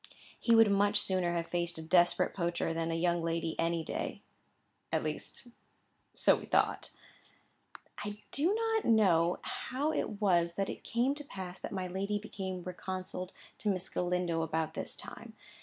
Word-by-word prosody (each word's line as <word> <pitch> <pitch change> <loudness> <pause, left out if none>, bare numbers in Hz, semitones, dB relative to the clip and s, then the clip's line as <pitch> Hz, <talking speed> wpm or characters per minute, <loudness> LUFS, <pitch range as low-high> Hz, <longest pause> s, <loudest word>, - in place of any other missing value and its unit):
He 230 - +4
would 225 -2 +7
much 205 +1 +4
sooner 180 -3 +1
have 170 -1 -3
faced 175 -1 -1
a 160 - -5
desperate 175 +1 +4
poacher 170 -2 -1
than 165 0 -1
a 165 - 0
young 170 0 +1
lady 165 -1 -1
any 165 0 +1
day. - - -4 0.7
At - - +1
least - - -4 0.7
so - - +6
we - - -8
thought. - - +2 1.1
I 205 0 -5
do 310 +6 +2
not 450 -1 +1
know 180 -7 +4
how 285 +5 -2
it 210 -2 -2
was 175 -4 +3
that 195 0 -1
it - - -9
came 245 +4 +1
to 295 0 -7
pass 190 -8 -7
that - - -6
my 190 -2 -2
lady 195 +3 -1
became 190 -3 -5
reconciled 185 0 -5 0.3
to 210 - 0
Miss 185 -1 -1
Galindo 180 -2 0
about 160 0 -1
this - - -2
time. - - -8
185 Hz, 165 wpm, -32 LUFS, 170-205 Hz, 1.1 s, would